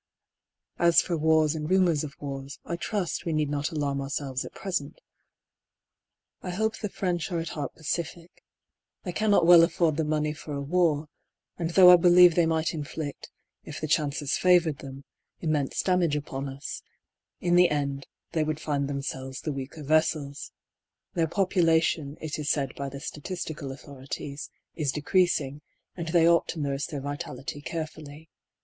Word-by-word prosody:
As 170 -1 +6
for 175 - 0
wars 160 -1 +3
and 155 -1 -4
rumours 180 -5 +3
of 145 -2 -7
wars, 140 -1 -6
I 170 - -3
trust 180 -1 -2
we 165 - -2
need 150 -2 0
not 145 +1 -1
alarm 140 -3 -2
ourselves 135 -1 -3
at - - -9
present. 170 -7 -4 1.4
I - - -6
hope 220 +5 -1
the 210 - -3
French 180 -2 -2
are 175 - -1
at 165 - -4
heart 145 -2 -5
pacific; 170 +2 -5 0.6
they 180 - -3
cannot 205 -2 +3
well 175 -1 +9
afford 165 -2 +2
the 160 - +1
money 150 0 0
for 155 -1 -8
a - - -3
war, 155 0 +1 0.5
and 165 -1 -1
though 180 +1 +8
I 180 - +9
believe 175 0 +7
they 170 0 +3
might 160 0 0
inflict, 150 -1 -6 0.3
if 155 - -7
the 155 - -3
chances 145 -2 0
favoured 175 -5 +4
them, 135 0 -9 0.4
immense 150 -4 -1
damage 180 -5 +2
upon 140 -1 -4
us, 135 +2 -7 0.6
in 175 0 0
the 180 0 +6
end 140 -2 -2 0.2
they 160 -2 +1
would 155 0 -2
find 145 -3 -1
themselves 135 -1 -5
the 155 - -3
weaker 140 +3 -7
vessels. 155 -1 0 0.6
Their 165 -2 +1
population, 165 -5 +1
LONDOX 155 -2 -4
245 - - -7
it - - -2
is 145 - -2
said 140 -4 0
by 140 -1 -4
the 140 0 -8
statistical 155 -1 -5
autlioi 135 0 -11
ities, 140 +1 -5 0.2
is 150 -5 -1
decreasing, 150 -2 +1 0.3
and 170 -2 -5
they 165 0 +4
ought 170 0 +4
to 165 - -4
nurse 140 -1 -2
their 145 -3 -5
vitality 145 0 -6
carefully. 155 -1 -7
155 Hz, 170 wpm, -27 LUFS, 145-170 Hz, 1.4 s, well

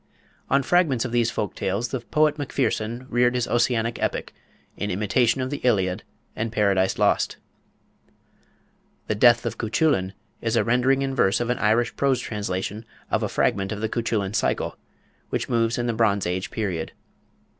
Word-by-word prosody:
On 140 +1 +3
fragments 145 -6 +2
of 120 - -4
these 120 -1 +2
folk 105 -3 -3
tales 100 +6 -2
the 130 - -2
poet 150 +5 +1
Macpherson 125 -3 -2
reared 125 0 +2
his 125 -1 +1
Ossianic 120 -1 0
epic, - - -2 0.4
in 105 - -3
imitation 115 +6 +1
of 130 +1 -3
the 145 - -2
Iliad 95 -7 +1 0.3
and 110 +1 -2
Paradise 100 -4 +2
Lost. - - +1 1.7
The - - -1
"Death 120 +2 +5
of - - -4
Cuchullin" 110 - +1 0.3
is 115 0 0
a - - +3
rendering 130 +3 +2
in 135 0 -2
verse 100 -6 +2
of 120 0 0
an 125 - -2
Irish 115 +3 +2
prose 135 -2 +2
translation 105 0 -4 0.3
of - - +1
a - - -1
fragment 95 0 0
of 105 - -3
the 110 0 -2
Cuchullin 110 -4 -1
Cycle, - - 0 0.5
which - - -2
moves 115 -1 +1
in 120 - -1
the 120 - 0
Bronze 105 -3 +1
Age 90 +2 -2
period. 90 -7 -3
115 Hz, 165 wpm, -24 LUFS, 105-125 Hz, 1.7 s, Death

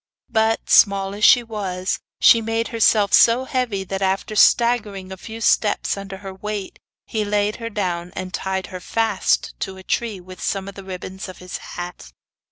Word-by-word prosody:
But, 220 0 +1
small 195 -2 +4
as 210 +1 -6
she 245 - +7
was, 195 -5 -3 0.2
she 230 - +6
made 225 +1 -1
herself 220 -3 +3
so 235 +2 +6
heavy 245 -7 -1
that, 195 +1 -5
after 195 +3 -1
staggering 210 -5 +3
a - - -5
few 220 +4 -9
steps 210 -1 +2
under 195 -1 -7
her 190 - -6
weight, 205 0 -6 0.3
he 215 -1 -2
laid 205 0 0
her 230 -1 -5
down, 180 -4 -3
and 185 -1 -5
tied 190 +1 -2
her 185 - -5
fast 220 +1 0
to 190 0 -4
a 190 - -11
tree 220 -1 -2
with 185 0 -12
some 195 -1 -2
of 200 - -7
the 195 - -10
ribbons 190 +1 -7
of 185 - -10
his 180 0 -7
hat. 175 - -8
200 Hz, 180 wpm, -21 LUFS, 190-220 Hz, 0.3 s, she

